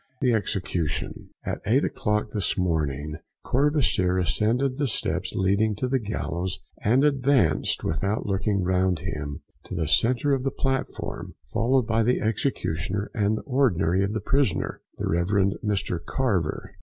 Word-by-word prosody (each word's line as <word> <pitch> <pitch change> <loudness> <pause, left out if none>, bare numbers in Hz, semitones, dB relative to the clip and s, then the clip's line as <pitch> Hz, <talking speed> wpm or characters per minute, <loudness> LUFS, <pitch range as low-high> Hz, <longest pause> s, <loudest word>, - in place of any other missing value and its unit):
THE 125 -2 +2
EXECUTION. 90 -7 -2 0.2
At - - -3
eight - - +3
o'clock 105 0 -1
this 105 -5 -1
morning, 75 -4 -1 0.3
Courvoisier 130 - +2
ascended 110 - +1
the 145 - +2
steps 115 - -2
leading 100 +3 +2
to 125 +6 -2
the 130 +1 +1
gallows, 95 -4 -3 0.2
and 125 +6 +3
advanced, 135 - +2
without 100 +7 -1
looking 100 0 0
round 90 -2 +1
him, 75 -3 -5 0.2
to - - -6
the 80 -3 -1
centre 125 - +3
of 135 - +1
the 135 - 0
platform, 135 -1 -3 0.2
followed 125 +1 +2
by 115 0 +2
the 125 +3 +2
executioner 100 - -1
and 105 0 +1
the - - -6
ordinary 95 - +2
of 100 +1 -1
the 110 - -2
prison, 135 -3 +2 0.3
the - - -2
Rev. 85 +1 +1 0.4
Mr 100 -5 -1
Carver. 100 - -1
105 Hz, 145 wpm, -25 LUFS, 90-125 Hz, 0.4 s, eight